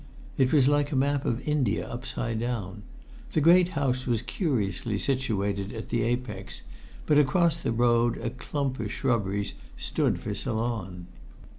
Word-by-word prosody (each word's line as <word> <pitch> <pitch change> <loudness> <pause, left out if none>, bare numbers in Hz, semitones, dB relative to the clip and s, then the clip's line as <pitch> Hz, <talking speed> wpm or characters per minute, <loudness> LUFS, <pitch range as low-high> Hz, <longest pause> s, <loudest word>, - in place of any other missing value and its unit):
It 130 -1 +2
was 140 -4 +5
like 145 +1 +2
a - - -1
map 140 +1 +1
of 120 +4 -2
India 140 -8 +1
upside 120 -2 -3
down. 110 -5 -3 0.5
The - - +3
great 175 +4 +6
house 130 -2 0
was 120 -2 +1
curiously 110 - -1
situated 100 -6 -1
in 110 - -6
the 120 - +1
apex, 115 -4 -3 0.4
but 150 -1 +5
across 165 +4 +3
the - - -1
road 120 0 +3
a 115 - -3
clump 135 0 -3
of 105 -2 -3
shrubberies 105 -6 -1 0.2
stood - - 0
for 105 - -4
Ceylon. 110 -5 -3
120 Hz, 150 wpm, -27 LUFS, 105-135 Hz, 0.5 s, great